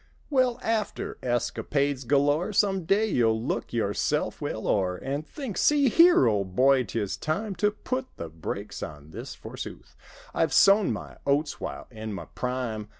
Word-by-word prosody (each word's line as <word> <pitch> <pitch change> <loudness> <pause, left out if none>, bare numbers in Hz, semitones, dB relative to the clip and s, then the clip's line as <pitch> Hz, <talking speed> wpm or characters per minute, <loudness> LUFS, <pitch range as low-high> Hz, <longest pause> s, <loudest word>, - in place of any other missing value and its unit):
Well, 255 -3 +3
after 220 -2 -2
escapades 135 +2 -1
galore. 145 - +2
Some 195 -3 +2
day 200 +5 +3
you'll 115 - +2
look 115 - -3
yourself 105 -4 -1
well - - -3
o'er 95 -3 +1
And 140 +7 -4
think—"See 280 - +1
here, 335 - +6
old 100 -5 0
boy, 130 +1 +4
'tis 105 -1 -2
time 195 +7 -2
To 210 +4 +3
put 255 +5 -4
the 85 - -5
brakes 80 0 -6
on 75 0 -8
this - - -7
forsooth: - - -9 0.4
I've 160 - +1
sown 200 0 +6
my - - -6
oats 145 +2 +1
while - - -5
in 110 -2 -6
my 100 - -6
prime. 125 -4 -4
140 Hz, 150 wpm, -27 LUFS, -, 0.4 s, here